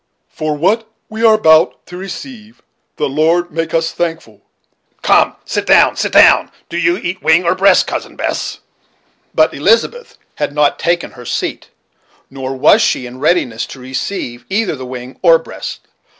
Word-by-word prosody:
'For 155 -2 -3
what 215 +8 0 0.2
we 220 +1 -5
are 220 -1 +6
about 160 -5 +3
to 180 - -11
receive, 215 +4 -9 0.3
the 150 - -1
Lord 165 +5 +1
make, 165 +1 -3
us 165 0 0
thankful 165 -11 -5 0.6
Come, - - +3
sit - - -3
down, - - +5
sit - - -2
down. - - +5 0.2
Do 170 - -4
you 170 +1 +2
eat 185 +1 -5
wing 160 +3 +3
or 170 - +3
breast, 190 0 +4
Cousin - - -5
Bess?" - - -4 0.7
But - - +3
Elizabeth 485 +1 0 0.2
had - - -2
not 150 -1 +2
taken 170 +1 -1
her 125 -1 -13
seat, - - -4 0.6
nor 135 0 -5
Was 205 - +5
she 175 - 0
in 125 +1 -10
readiness 135 -7 0
to 135 - -11
receive 130 -1 -5
either 205 -3 0
the 130 -2 -8
wing 125 0 -9
or 165 -3 +6
breast. 165 - -8
165 Hz, 165 wpm, -15 LUFS, 135-190 Hz, 0.7 s, are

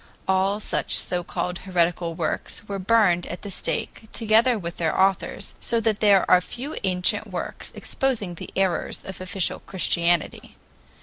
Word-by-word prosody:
All 190 +2 +2
such - - -1
so 180 -1 -1
called 180 +1 -3
heretical 175 -2 0
works 170 +6 -2
were 200 -1 -3
burned 190 -4 +3
at 175 - -7
the 200 - -5
stake, 220 +3 -3
together 225 +2 +3
with 170 -3 -6
their 160 -2 0
authors, 190 -1 +1
so 230 - +1
that 220 -2 0
there 200 -3 +5
are 180 - +6
few 260 +10 -5
ancient 180 -2 +1
works - - -4
exposing 235 -9 -1
the 170 - -8
errors 190 -3 0
of 190 -1 -7
official 185 0 0
Christianity. 175 -2 0
190 Hz, 150 wpm, -24 LUFS, 175-215 Hz, -, are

